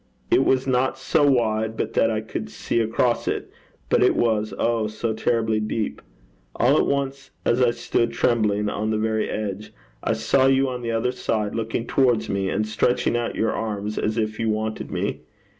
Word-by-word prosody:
It 135 - +5
was 130 0 +2
not 130 0 +1
so 145 +3 +1
wide 110 -3 +1
but - - -2
that - - +3
I - - -1
could - - -5
see 115 - -2
across 115 +2 +1
it, - - -2 0.4
but - - +2
it - - +4
was 110 -2 +1
oh! 115 -2 +1
so 110 +1 -2
terribly 110 -1 +1
deep. 110 0 -3 0.5
All - - +3
at - - +2
once, 140 -1 -2 0.2
as 120 +2 +2
I 125 - +5
stood 115 0 0
trembling 105 -3 +1
on 105 +1 -2
the 110 - +1
very 110 0 0
edge, 105 0 -4 0.3
I - - +1
saw 110 +5 +2
you 135 0 +3
on 125 -1 -5
the 120 - -3
other 115 +2 0
side, 110 -4 -2
looking 115 +1 -2
towards 125 -4 +2
me, 100 -1 -1
and 105 +3 0
stretching 120 +3 +1
out 120 0 -1
your 110 - +1
arms 105 -1 -3
as 110 +1 -1
if 110 -1 -1
you 115 -1 0
wanted 110 0 -2
me. - - -2
115 Hz, 190 wpm, -23 LUFS, 110-125 Hz, 0.5 s, It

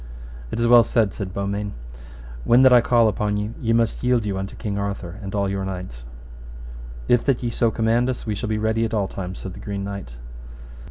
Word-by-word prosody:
It - - -4
is 115 - +2
well 120 0 +7
said, 110 -5 +1
said 100 -3 -5
Beaumains; 100 +2 -3 0.7
when 120 - +5
that 130 -1 +7
I 120 - +7
call 115 -1 +4
upon 105 0 0
you 105 +2 -3
ye 115 - 0
must 115 -1 +1
yield 125 -3 +2
you 100 -2 -2
unto 95 +1 -5
King 100 -3 -4
Arthur, 100 -2 -4
and 100 0 -6
all 100 -1 +1
your 95 0 -2
knights. 90 -11 -6 1.0
If 120 -1 +3
that 135 -3 +1
ye 120 - -1
so 115 0 +2
command 115 +3 +1
us, 125 - -4
we 110 - -1
shall 105 +2 -4
be 110 - 0
ready 110 +1 0
at 115 0 -1
all 100 -2 0
times, 95 -1 -6
said 95 - -7
the - - -10
Green 100 -1 -4
Knight. 100 -11 -6
105 Hz, 220 wpm, -22 LUFS, 100-115 Hz, 1.0 s, well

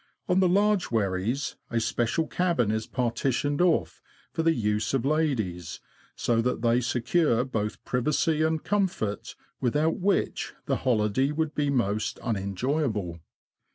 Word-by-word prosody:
On 180 0 +3
the 185 -2 +4
large 205 +1 +3
wherries, 110 +5 -1
a 115 - 0
special 120 +7 0
cabin 170 - +1
is 110 0 -2
partitioned 130 +4 0
off 175 -2 +1 0.3
for - - -1
the 165 0 +3
use 105 +1 0
of 130 -1 0
ladies, 125 - -1 0.4
so 115 -1 +1
that 125 0 -1
they 120 +1 +3
secure 125 +1 +1
both 110 -5 -3
privacy 150 +5 +1
and 160 0 +1
comfort, 185 - -1 0.2
without 150 +6 +1
which 195 +2 0
the - - 0
hoHday 125 +2 +1
would 160 -1 -1
be 145 -1 0
most 110 -6 0
unenjoyable. 105 - -1
125 Hz, 135 wpm, -27 LUFS, 110-160 Hz, 0.4 s, the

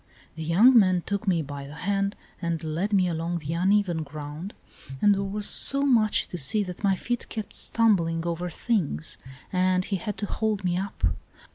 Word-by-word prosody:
The 160 - -8
young 190 +11 +5
man 185 -5 +5
took 200 +2 -3
me 170 -4 +2
by 140 -1 -7
the 145 - -10
hand 200 +3 -1 0.3
and 170 -2 -2
led 165 +6 -2
me 190 -3 +3
along 170 +1 -2
the 160 -1 -4
uneven 185 -1 +2
ground, 150 +5 -7 0.4
and 205 +5 +5
there 195 - -1
was 200 +1 -2
so 275 0 +1
much 230 -6 +3
to 175 - -4
see 205 +10 +1
that 180 +1 -8
my 195 -1 +3
feet 240 +5 -3
kept 220 -3 -6
stumbling 170 -8 +2
over 170 +1 -2
things, 165 - -1 0.3
and 185 0 +2
he 195 - -1
had 210 +1 -5
to 205 - -2
hold 215 -1 -1
me 175 -1 +1
up. 195 +2 -5
185 Hz, 185 wpm, -26 LUFS, 165-205 Hz, 0.4 s, young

